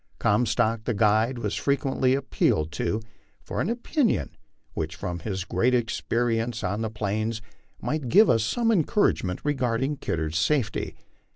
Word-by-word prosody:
Comstock, 115 +1 +1
the 120 - 0
guide, 110 +4 +3
was 105 -3 -2
frequently 135 -2 +1
appealed 80 - 0
to 105 +5 -1 0.4
for - - -3
an 180 - -1
opinion 240 +2 0 0.4
which, 80 0 -3
from 90 +1 -4
his 95 +1 -3
great 125 +6 +1
experience 115 0 -1
on 100 +3 -1
the 110 - -1
Plains, 110 +1 -2 0.4
might 150 -5 -2
give 210 - +7
us 115 -1 +3
some 230 - +1
encouragement 160 - +1
regarding 135 0 0
Kidder's 80 -7 -2
safety. 140 - 0
115 Hz, 135 wpm, -26 LUFS, 105-135 Hz, 0.4 s, give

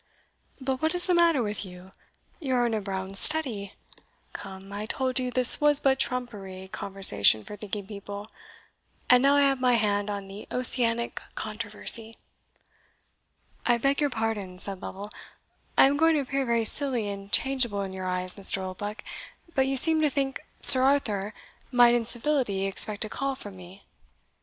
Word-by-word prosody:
But 265 -1 -4
what 315 +3 -1
is 355 - +1
the 365 - 0
matter 335 -6 +2
with 210 -1 -5
you? 180 -1 -13 0.5
you 270 -6 -3
are 245 -1 +1
in 235 - -2
a 215 - -3
brown 190 -1 -6
study! 225 -6 +2 0.6
Come, 195 0 -11
I 210 +1 -6
told 260 +2 -2
you 250 -1 -3
this 250 +2 +8
was 295 -1 +3
but 265 -2 0
trumpery 205 -8 -5
conversation 110 - +2
for 210 - -10
thinking 205 -1 -7
people 205 +1 -10 0.8
and 250 0 +5
now 280 +1 +3
I 285 - +3
have 275 -2 0
my 250 -1 +2
hand 205 -2 -1
on 200 -1 -6
the 195 +2 -12
Ossianic 235 -2 -1
Controversy." 220 +1 +3 1.5
"I 240 -1 +1
beg 275 +5 -1
your 290 - 0
pardon," 220 -6 -5
said 190 0 -5
Lovel; 200 +2 -9 0.7
"I - - +6
am 280 +1 0
going 325 +1 +2
to 295 - 0
appear 270 0 -4
very 230 -1 -1
silly 250 -3 -1
and 200 0 -9
changeable 245 -7 -1
in 190 -1 -7
your 185 -1 -7
eyes, 180 0 -2
Mr. 195 -1 +5
Oldbuck 205 +3 -8 0.5
but 265 0 0
you 270 0 -2
seemed 320 +4 +5
to 305 - +1
think 270 -1 -4 0.2
Sir 260 - +10
Arthur 220 -7 -1 0.4
might 245 -1 +4
in 240 -1 -1
civility 240 -6 -1
expect 205 +2 -1
a - - -9
call 275 +3 -4
from 205 -6 -9
me?" 185 +2 -15
225 Hz, 170 wpm, -25 LUFS, 200-265 Hz, 1.5 s, Sir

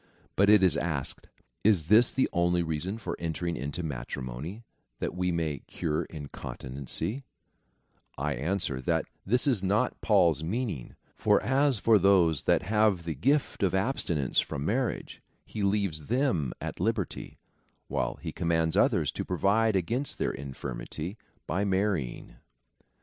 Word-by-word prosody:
But 100 +1 +4
it 105 -2 +7
is 90 -5 +4
asked 75 -6 -3
— - - -37
" - - -39
Is 100 -6 +4
this 110 +9 +5
the 130 - +1
only 85 0 +2
reason 80 +6 -2
for 90 -6 -4
entering 85 +1 -2
into 70 +6 -4
matrimony, 65 - -5 0.3
that - - -3
we 90 0 0
may 80 -4 -1
cure 75 -3 -2
incontinency 70 - -5
V 140 - -11 0.9
I 70 +2 -1
answer, 70 -1 -2
that - - 0 0.2
this 125 +5 +2
is 125 -9 +2
not 105 +6 0
Paul's 85 -8 +4
meaning; 95 - -3 0.2
for - - +3
as 135 +2 +3
for 110 +1 +4
those 90 -5 +4
that - - +3
have 105 -4 +2
the 80 -1 -3
gift 135 - +1
of 95 -1 +2
abstinence 90 - +1
from 70 +1 -2
marriage, 120 +5 -2 0.2
he 105 - -6
leaves 100 -6 0
them 120 - +1
at - - -5
liberty,^ 105 0 -2 0.5
while - - -1
he - - -6
commands 80 -1 0
others - - +3
to - - -4
provide 110 +2 +2
against 115 +10 -1
their - - 0
infirmity 75 +6 -5 0.3
by 95 +6 -1
marrying. 95 -9 -1
90 Hz, 150 wpm, -29 LUFS, 75-105 Hz, 0.9 s, it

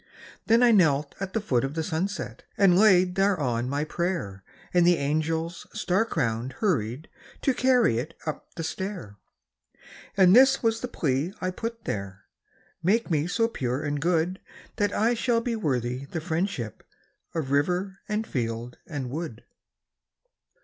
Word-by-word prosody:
Then 230 +2 +5
I 240 - +6
knelt 150 -8 +3
at 195 -1 -4
the 225 - +1
foot 130 - 0
of 135 +3 -3
the 160 - -1
sunset, 185 +5 -3 0.2
And 195 -3 +5
laid 185 -3 +5
thereon 145 -12 +1
my 145 +2 -1
prayer, 155 - -3 0.3
And 175 -1 +5
the 175 -1 +5
angels, 160 +4 -1
star 190 +5 +1
crowned, 120 - -2
hurried 145 - -1 0.4
To 270 - +3
carry 250 - +3
it 155 +7 -6
up 155 -2 -5
the 165 - -4
stair. 180 - -5 1.0
And 190 0 +7
this 270 +1 +6
was 225 0 +2
the 250 - -2
plea 155 - -1
I 185 0 -1
put 230 +4 -6
there: 95 -1 -4 0.6
Make 200 +4 +1
me 155 0 +1
so 225 +5 +1
pure 130 - -2
and 145 -1 -2
good 175 +2 +1 0.4
That 205 -1 +1
I 225 +3 +2
shall 235 0 +1
be 230 0 -2
worthy 130 - -1
the 160 - -4
friendship 160 - -3 0.5
Of 150 -5 -2
river, 180 +7 0
and 215 +1 -1
field, 120 - -4
and 135 -6 -4
wood. 150 -6 -5
170 Hz, 155 wpm, -26 LUFS, 135-205 Hz, 1.0 s, And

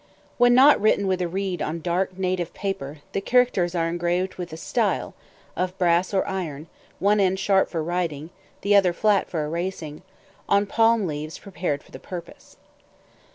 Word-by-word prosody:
When 245 0 +6
not 270 -1 +7
written 205 -1 +3
with 185 -1 0
a 180 - 0
reed 190 0 -3
on 160 +2 -2
dark 180 +2 -1
native 185 -2 -2
paper, 155 -7 -4
the 195 - -2
characters 200 -7 +2
are 165 -1 +1
engraved 175 +2 -1
with 175 -2 -7
a 160 - -7
style - - -1 0.4
(of 185 +1 -2
brass 175 0 +2
or 195 -2 0
iron, 160 -6 -4 0.3
one 205 +1 +2
end 190 -1 +2
sharp 195 0 +2
for 165 -3 -2
writing, 165 -2 -3 0.3
the 205 +1 +3
other 185 -3 +4
flat 210 +2 +2
for 155 -3 -2
erasing) 165 -1 -4 0.5
on 200 +1 +4
palm 225 0 +3
leaves 155 -1 -5
prepared 175 -7 -4
for - - -21
the - - -9
purpose. 175 -2 -10
185 Hz, 170 wpm, -24 LUFS, 170-195 Hz, 0.5 s, not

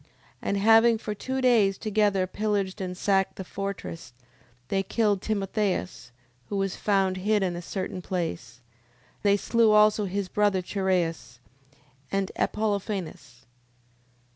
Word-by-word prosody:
10:37. - - -29 0.3
And 200 - -1
having 225 +3 +5
for 215 -1 -5
two 260 +5 -3
days 220 -7 +4
together 205 -3 +1
pillaged 200 0 -2
and 180 -1 -4
sacked 195 0 +1
the 190 - -6
fortress, 195 -6 -6 0.6
they 195 - +1
killed 205 0 0
Timotheus, 200 - -2 0.4
who 200 - -2
was 195 -1 -1
found 195 -2 +1
hid 205 +2 +1
in 180 -2 -1
a 175 - -5
certain 185 +1 -5
place: 160 -10 -4 0.6
they 200 0 +3
slew 230 +2 +2
also 210 0 +5
his 195 0 -2
brother 200 -1 +1
Chereas, 175 -9 -1 0.7
and 195 -1 -1
Apollophanes. 195 - -3
195 Hz, 130 wpm, -26 LUFS, 185-210 Hz, 0.7 s, having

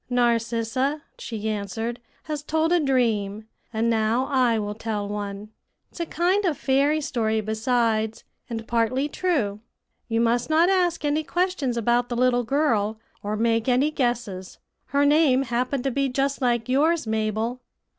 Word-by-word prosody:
"Narcissa," 240 +4 0 0.2
she 220 -2 -5
answered, 220 +3 -3 0.2
"has 300 -2 -4
told 320 +2 0
a 350 - +4
dream, 220 -7 0 0.2
and 225 0 0
now 225 +2 +2
I 255 -5 +2
will 210 -1 -2
tell 210 -1 -3
one. 205 0 -5 0.4
It's - - -13
a 340 - -2
kind 365 +6 +1
of 335 -6 0
fairy 280 +3 +2
story 220 -5 0
besides, 220 0 0 0.3
and 225 -1 -5
partly 240 +4 +1
true. 280 - -1 0.5
You 225 -1 0
must 235 +3 +1
not 325 +3 +4
ask 355 -4 +1
any 295 +2 +1
questions 350 -8 -1
about 240 +2 +1
the 240 - -2
little 245 0 +3
girl, 225 -5 +1 0.2
or 205 +1 -2
make 230 +1 +1
any 265 +5 +3
guesses. 235 -9 -2 0.3
Her 280 0 +2
name 285 -3 +4
happened 250 +1 -1
to 270 - 0
be 275 +2 0
just 275 +2 -1
like 240 -3 +1
yours, 305 +5 +2
Mabel." 220 +3 -1
240 Hz, 155 wpm, -24 LUFS, 220-280 Hz, 0.5 s, a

